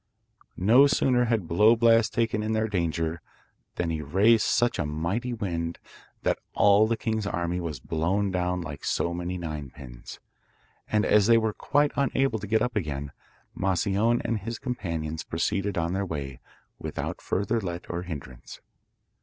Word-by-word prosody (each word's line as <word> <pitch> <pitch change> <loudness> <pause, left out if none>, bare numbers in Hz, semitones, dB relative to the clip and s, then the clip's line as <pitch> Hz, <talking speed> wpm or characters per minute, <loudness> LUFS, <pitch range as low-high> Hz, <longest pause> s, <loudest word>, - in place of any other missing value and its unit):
No 120 +9 +6
sooner 125 -3 +2
had 115 -7 0
Blow 105 +8 +5
Blast 115 -1 +4
taken 115 -2 0
in 110 +1 -1
their 110 0 +1
danger 85 -4 -1 0.5
than 85 -2 -1
he 80 -1 -2
raised 100 +10 +3
such 120 0 +2
a 75 - 0
mighty 85 - -2
wind 85 -7 -3 0.5
that - - +1 0.2
all 105 +1 +5
the 115 0 0
king's 110 -2 -2
army 85 -1 -2
was 80 -6 -4
blown 95 +8 -1
down 90 0 -1
like 85 - -7
so 85 - 0
many 90 +1 -3
nine 75 -5 -5
pins, - - -11 0.7
and 105 0 +1
as 105 -1 +4
they 115 -1 +6
were 110 -1 +1
quite 145 +4 +1
unable 135 -3 +1
to 105 - -7
get 110 +2 +2
up 125 -1 -2
again, 70 -7 -3 0.4
Moscione 100 +5 +1
and 115 -2 0
his 115 +4 -5
companions 85 - -4
proceeded 100 +4 -1
on 85 +1 0
their 100 +1 0
way 70 -7 -5 0.4
without - - -5
further 105 +4 -1
let 85 -2 -5
or 85 0 -3
hindrance. 70 -8 -8
95 Hz, 160 wpm, -27 LUFS, 85-110 Hz, 0.7 s, No